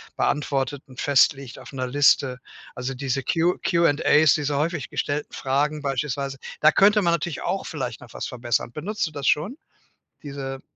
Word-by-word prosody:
beantwortet 140 Hz, -1 st, -1 dB
und 130 Hz, -1 st, -13 dB
festlegt 135 Hz, -2 st, +2 dB
auf -, -, -12 dB
'ne 130 Hz, -1 st, -2 dB
Liste, 135 Hz, -1 st, +3 dB, 0.4 s
also, 125 Hz, +2 st, -4 dB
diese 135 Hz, 0 st, -2 dB
Q 170 Hz, +4 st, +1 dB
Q&As, 155 Hz, -3 st, +4 dB
diese 145 Hz, -2 st, -1 dB
häufig 155 Hz, -1 st, -2 dB
gestellten 145 Hz, +1 st, -3 dB
Fragen 145 Hz, +3 st, -1 dB
beispielsweise, 140 Hz, 0 st, -2 dB, 0.2 s
da 155 Hz, -, +7 dB
könnte 210 Hz, +5 st, +5 dB
man 170 Hz, -3 st, +2 dB
natürlich 170 Hz, -2 st, -2 dB
auch -, -, -2 dB
vielleicht -, -, -5 dB
noch -, -, -14 dB
was -, -, -4 dB
verbessern. 120 Hz, -1 st, -2 dB
Benutzt 195 Hz, -, -3 dB
du -, -, -9 dB
das 145 Hz, -2 st, -4 dB
schon? 175 Hz, -, +1 dB, 0.7 s
Diese 135 Hz, -2 st, -6 dB
145 Hz, 160 wpm, -24 LUFS, 135-155 Hz, 0.7 s, da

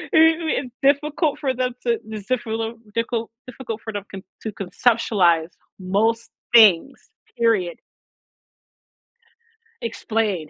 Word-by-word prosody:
Ooh, 320 Hz, +1 st, +5 dB
it's 250 Hz, -2 st, -9 dB
difficult 295 Hz, +2 st, +2 dB
for 265 Hz, -3 st, 0 dB
them 250 Hz, 0 st, -1 dB
to 235 Hz, -1 st, +1 dB
it's 215 Hz, -1 st, -7 dB
difficult 225 Hz, -2 st, -2 dB, 0.2 s
dicul 230 Hz, 0 st, -1 dB, 0.2 s
difficult 230 Hz, -3 st, -7 dB
for 220 Hz, -, -5 dB
them 205 Hz, -1 st, -4 dB
con 190 Hz, -1 st, -7 dB, 0.2 s
to 220 Hz, -, -3 dB
conceptualize 190 Hz, -5 st, +1 dB, 0.3 s
most 220 Hz, +5 st, 0 dB, 0.3 s
things, 220 Hz, +3 st, +5 dB, 0.3 s
period. 220 Hz, -7 st, +1 dB, 2.0 s
Explain. 215 Hz, -7 st, -2 dB
230 Hz, 110 wpm, -22 LUFS, 205-255 Hz, 2.0 s, Ooh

